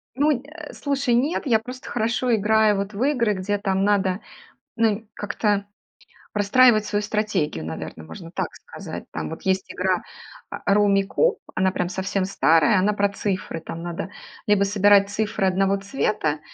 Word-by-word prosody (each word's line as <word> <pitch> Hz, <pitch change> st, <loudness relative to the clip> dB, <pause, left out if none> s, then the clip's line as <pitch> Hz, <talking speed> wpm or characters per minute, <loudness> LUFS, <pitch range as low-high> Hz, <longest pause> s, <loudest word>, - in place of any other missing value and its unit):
Ну, 290 Hz, +3 st, +3 dB
э, 300 Hz, +1 st, -10 dB
слушай, 275 Hz, -4 st, 0 dB
нет, 280 Hz, +5 st, 0 dB
я 225 Hz, -4 st, +4 dB
просто 250 Hz, +3 st, -9 dB
хорошо 235 Hz, +1 st, 0 dB
играю 215 Hz, 0 st, +3 dB
вот 200 Hz, +1 st, -3 dB
в 205 Hz, +5 st, -4 dB
игры, 235 Hz, -7 st, +2 dB
где 200 Hz, +2 st, -2 dB
там 195 Hz, -1 st, 0 dB
надо, 195 Hz, -2 st, +1 dB, 0.6 s
ну, 225 Hz, -1 st, +3 dB
нь 215 Hz, +1 st, -4 dB
как-то 205 Hz, -1 st, -1 dB, 0.7 s
простраивать 215 Hz, +2 st, +4 dB
свою 205 Hz, -, -1 dB
стратегию, 205 Hz, -, -1 dB
наверно, 80 Hz, 0 st, -6 dB
можно 80 Hz, -, -10 dB
так -, -, -1 dB
сказать. -, -, -9 dB
Там 80 Hz, -1 st, -4 dB
вот -, -, -8 dB
есть 190 Hz, +2 st, -1 dB
игра, -, -, 0 dB, 0.5 s
а, 200 Hz, -, 0 dB
"Руммикуб" 205 Hz, -, +2 dB, 0.2 s
она 190 Hz, 0 st, +2 dB
прям 180 Hz, -1 st, -2 dB
совсем 190 Hz, +1 st, -2 dB
старая, 175 Hz, 0 st, +3 dB
она 210 Hz, +3 st, +2 dB
про 200 Hz, 0 st, +1 dB
цифры, 195 Hz, -4 st, -3 dB
там 165 Hz, +1 st, -7 dB
надо 175 Hz, +2 st, -5 dB, 0.4 s
либо 205 Hz, -1 st, +4 dB
собирать 200 Hz, 0 st, +4 dB
цифры 210 Hz, -1 st, -1 dB
одного 195 Hz, +1 st, +2 dB
цвета, 195 Hz, -, -1 dB
205 Hz, 160 wpm, -23 LUFS, 190-220 Hz, 0.7 s, я